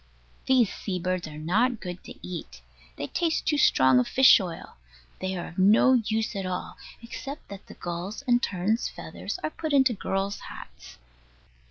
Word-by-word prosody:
These 250 -6 +4
sea 190 -3 -4
birds 180 -1 -2
are 150 -1 -9
not 220 +10 +1
good 180 -1 -7
to - - -10
eat. 65 - -8 0.3
They - - -4
taste 330 - -1
too 295 -1 +1
strong 130 - +5
of 125 - +1
fish 265 -2 +7
oil. 175 - -7 0.4
They 190 0 -3
are 175 - -5
of 175 - -8
no 215 +7 +6
use 225 -2 0
at 195 - -2
all, 180 0 -4 0.3
except 275 +5 -8
that 200 -1 -10
the - - -12
gulls' 175 +8 -5
and 245 -2 +3
terns' 200 +5 0
feathers - - -6
are 310 - -1
put 315 -2 -4
into 265 -3 +5
girls' 195 0 -2
hats. - - -12
195 Hz, 175 wpm, -27 LUFS, 175-245 Hz, 0.4 s, fish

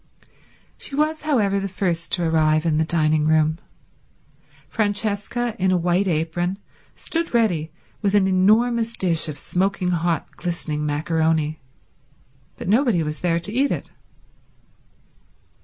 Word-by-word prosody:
She 275 - -6
was, 310 +2 0
however, 215 -10 +1
the 195 - -3
first 175 -3 -2
to 175 -2 +1
arrive 155 -1 +2
in 155 -2 +2
the - - +3
dining 155 -1 +2
room. 155 +1 +2 1.1
Francesca 215 +2 -1
in 190 0 +2
a 185 - +3
white 175 +3 +1
apron 175 +3 -1 0.4
stood 330 -5 -2
ready 175 -9 +1 0.3
with 205 -1 +1
an 200 -2 +4
enormous 225 +5 +2
dish 170 -3 +1
of 145 - -6
smoking 185 +2 -1
hot, 170 -2 -1
glistening 155 -4 -3
macaroni, 155 0 0 1.0
but - - -7
nobody 220 - +3
was 150 0 -4
there 170 -2 +1
to 205 +5 -4
eat 275 +4 +2
it. - - -4
180 Hz, 130 wpm, -22 LUFS, 160-210 Hz, 1.1 s, an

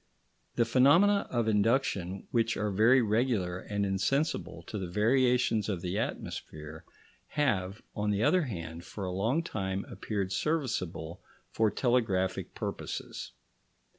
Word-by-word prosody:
The 120 - +3
phenomena 165 - +5
of 120 -3 0
induction, 105 -4 +1
which 115 -1 +1
are 105 -1 -1
very 115 +6 +5
regular 105 -5 +1
and 100 +1 -2
insensible 95 - -1
to 105 - -5
the 95 - -3
variations 115 +2 +2
of 95 -5 -2
the 90 +4 -2
atmosphere, 75 -7 -5 0.4
have, 105 -9 -1
on 105 -1 -1
the 105 +1 +1
other 185 +9 +4
hand, 85 - -6
for 100 +2 -6
a 90 - -3
long 115 - +1
time 95 - -3
appeared 100 -3 -3
serviceable 95 - -2 0.3
for 110 -1 +2
telegraphic 100 -6 0
purposes. - - -5
105 Hz, 130 wpm, -30 LUFS, 95-125 Hz, 0.4 s, phenomena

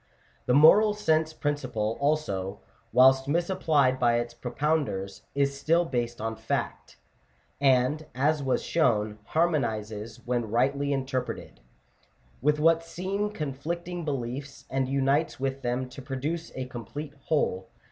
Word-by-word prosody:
The 125 - +4
moral 205 +8 +7
sense 160 -6 +1
principle, 130 -8 -2
also, 105 -10 -1 0.3
whilst 130 +1 +5
misapplied 150 -5 +2
by 120 -1 +3
its 120 0 -3
propounders, 125 -6 -2
is 140 0 +1
still 165 +5 +2
based 120 -5 -2
on 110 0 -3
fact; - - -4 0.6
and, 135 +3 +2
as 145 +3 +2
was 135 -2 0
shown, 110 -9 +1
harmonizes, 110 -10 -1
when 120 -3 -1
rightly 140 +5 +1
interpreted, 130 - -3 0.8
with 150 +3 +2
what 165 +1 +4
seem 195 +5 -2
conflicting 170 +1 -4
beliefs, 135 -1 -4
and 130 0 0
unites 140 +3 +1
with 135 0 -2
them 125 +1 -1
to 130 +2 -10
produce 145 +6 -4
a 130 - -3
complete 130 +4 -7
whole. 95 - 0
135 Hz, 125 wpm, -27 LUFS, 120-155 Hz, 0.8 s, moral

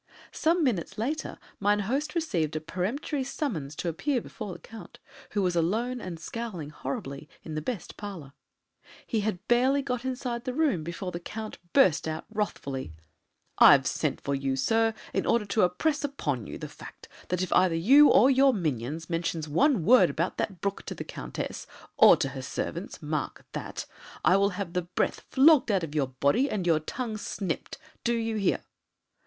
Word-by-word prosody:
Some 335 +1 +2
minutes 215 - -1
later 290 +8 -3 0.2
mine 205 +1 +2
host 275 - -2
received 175 - 0
a - - 0
peremptory 225 - -2
summons 195 - -3
to 175 - -4
appear 250 - 0
before 215 -3 -7
the - - -8
Count, 220 -6 -12 0.4
who 205 -2 +1
was 180 -1 +1
alone 225 +9 0
and 175 -3 -6
scowling 180 -5 -5
horribly, 140 +1 -6
in 160 - -7
the 155 - -2
best 195 -1 -5
parlour. 180 -10 -8 0.7
He 225 - -1
had 205 -2 -3
barely 260 +4 +3
got 250 -2 -2
inside 250 -2 -3
the 255 -1 -3
room 280 - +1
before 175 +3 -5
the 170 - -5
Count 215 +4 -7
burst 175 - +4
out 155 0 -4
wrathfully: 140 - -3 0.7
"I've - - +8
sent - - -1
for 140 - -2
you, 135 -1 -1
sir, 225 +11 +2 0.2
in - - 0
order 230 -3 +2
to 210 +2 +1
impress 285 - +1
upon 145 - -2
you - - -6
the - - -6
fact - - -12 0.2
that 180 0 0
if 185 - -1
either 180 -2 +4
you 270 - +7
or 265 - +6
your 270 -1 +5
minions 155 - -2
mention 165 -1 -2
one 185 - +2
word 235 -6 +7
about 165 +6 -2
that 185 -5 -3
brook 200 0 -2
to - - -4
the - - -5
Countess, - - -6 0.3
or - - +8
to 135 - -1
her 135 0 -6
servants 165 +6 -5
mark 150 0 -3
that - - -5 0.4
I 180 - +6
will 200 0 +4
have 190 -4 -4
the 180 - +1
breath 175 +1 -1
flogged 285 -1 +6
out 195 -4 +2
of 155 -3 -5
your 145 -3 +1
body 140 - +1
and 195 -4 -2
your 165 -3 +4
tongue 220 - -4
snipped. 195 -4 -4 0.3
Do 235 0 +1
you 225 -1 -1
hear?" 195 - +1
195 Hz, 180 wpm, -28 LUFS, 160-245 Hz, 0.7 s, I've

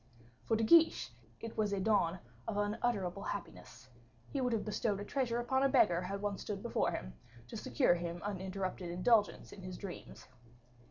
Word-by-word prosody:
For 225 - +2
De 225 - +1
Guiche 325 +7 +5 0.3
it 225 -1 -6
was 215 -1 +1
the 200 -1 -1
dawn 190 -4 +2 0.3
of 210 - -2
unutterable 205 -3 0
happiness; 130 -11 -7 0.4
he 275 - -1
would 250 -1 +1
have 225 -2 0
bestowed 210 -1 0
a 205 - -5
treasure 250 -1 0
upon 265 +2 +1
a 275 - +4
beggar, 180 -10 +4
had 200 +2 -4
one 205 -1 -1
stood 200 -2 -5
before 235 - +1
him, - - -5 0.4
to - - -7
secure 125 +7 +2
him 170 0 -3
uninterrupted 190 -2 -3
indulgence 205 +5 +2
in 195 - -10
his 185 -1 -6
dreams. 195 -3 -8
205 Hz, 175 wpm, -34 LUFS, 185-230 Hz, 0.4 s, Guiche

